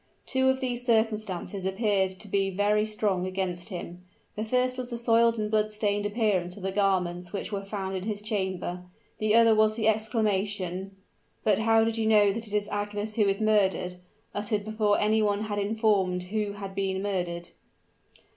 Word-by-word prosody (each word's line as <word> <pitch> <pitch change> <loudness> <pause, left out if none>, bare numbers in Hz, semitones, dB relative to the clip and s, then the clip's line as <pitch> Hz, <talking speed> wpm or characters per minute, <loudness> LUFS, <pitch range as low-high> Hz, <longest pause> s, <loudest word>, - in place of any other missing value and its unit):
Two 260 0 +2
of 265 0 +1
these 245 -1 -2
circumstances 215 -5 0
appeared 190 0 +1
to 190 +3 -9
be 195 0 +1
very 205 +2 +1
strong 200 -4 0
against 185 0 -3
him. 180 -1 -7 0.3
The 215 - -2
first 250 +3 +1
was 255 -1 -5
the 240 - -4
soiled 230 0 +3
and 210 -1 -2
blood 215 -1 +2
stained 205 -1 0
appearance 205 -5 0
of 200 - -10
the 190 - -1
garments 180 -3 0
which 200 - -4
were 200 -1 -3
found 195 -1 -4
in 185 0 -4
his 210 -1 -3
chamber; 190 -4 -2 0.4
the 215 0 +2
other 230 -1 +6
was 215 0 +3
the 220 -1 0
exclamation 205 -4 -1 0.5
"But 210 -2 +3
how 225 0 +4
know 225 - +2
you 220 -3 +3
that 230 +1 -5
it 205 - -9
is 205 -1 +1
Agnes 205 +1 -3
who 210 -2 +2
is 195 0 +1
murdered?" 195 -4 +2 0.4
uttered 205 0 -2
before 215 -1 +1
any 215 +1 +3
one 205 -1 +1
had 205 -1 -2
informed 200 -4 +1
who 205 +2 -2
had 200 -1 -7
been 190 -1 -1
murdered. 175 -4 -2
205 Hz, 180 wpm, -27 LUFS, 190-220 Hz, 0.5 s, other